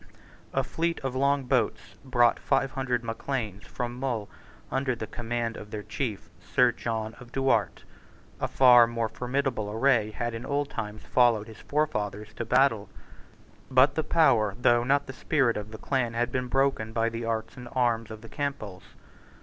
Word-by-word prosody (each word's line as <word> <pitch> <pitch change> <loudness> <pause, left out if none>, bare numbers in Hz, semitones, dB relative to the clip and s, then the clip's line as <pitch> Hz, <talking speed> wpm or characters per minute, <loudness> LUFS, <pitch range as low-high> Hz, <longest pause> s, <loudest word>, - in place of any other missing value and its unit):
A - - +1
fleet 165 +1 -2
of 135 -2 -3
long 140 +1 +2
boats 125 -3 -1
brought 120 -3 +3
five 135 -1 +1
hundred 125 -3 -1
Macleans 115 -3 -4
from 120 0 -5
Mull 120 -6 -2 0.4
under 135 -1 0
the 110 - -5
command 120 0 -3
of 105 - -9
their 105 0 -5
chief, 115 -6 -4
Sir 125 +7 +3
John 110 -1 -3
of 120 -1 -13
Duart. 135 0 +1 0.6
A - - 0
far 125 -3 +7
more 115 -1 -1
formidable 125 -2 -2
array 110 0 +2
had 120 +2 -3
in 115 +1 -5
old 145 +2 -1
times 105 0 -5
followed 120 -4 +3
his 110 -1 -12
forefathers 105 -8 -2
to 115 - -3
battle. 115 -4 +2 0.8
But 130 +1 +5
the 160 - -1
power, 115 - +3
though 120 -1 +4
not 140 +3 +2
the 130 - -8
spirit, 135 -5 +1
of 105 0 -5
the 110 - -8
clan 120 -2 -1
had 120 +1 0
been 125 0 -1
broken 135 -4 0
by 115 0 +1
the 115 0 -5
arts 115 -1 -3
and 125 -1 -9
arms 115 -3 +1
of 110 -1 -9
the 115 - -12
Campbells. 135 -10 -5
120 Hz, 175 wpm, -27 LUFS, 110-135 Hz, 0.8 s, far